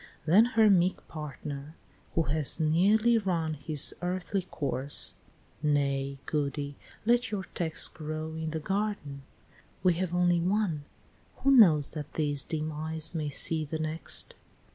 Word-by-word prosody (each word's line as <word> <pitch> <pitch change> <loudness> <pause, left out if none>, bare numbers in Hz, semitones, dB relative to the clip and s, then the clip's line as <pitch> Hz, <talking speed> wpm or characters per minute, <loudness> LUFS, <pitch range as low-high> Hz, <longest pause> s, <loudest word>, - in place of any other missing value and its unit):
Then 190 +8 +6
her 220 -1 +7
meek 185 -2 +2
partner, 150 -1 -7 0.4
who 165 - +3
has 155 +1 0
nearly 205 +9 +4
run 170 -6 -1
His 150 0 0
earthly 185 +2 -2
course, 140 -4 -1 0.5
"Nay, 140 -2 0
Goody, 145 -1 -2 0.3
let 240 +1 +3
your 205 -2 -3
text 160 -3 +1
Grow 155 0 -5
in 160 0 -4
the 160 0 -3
garden. 190 -6 -3 0.6
We 180 -2 +5
have 175 0 -2
only 175 -1 +3
one 180 -4 0 0.6
Who 275 - +5
knows 170 - +6
that 150 -2 -7
these 145 -3 +1
dim 155 -1 -3
eyes 155 +1 -3
may 155 -3 -2
see 155 +3 0
the 155 +2 -4
next? 155 +1 -1
160 Hz, 140 wpm, -29 LUFS, 150-185 Hz, 0.6 s, her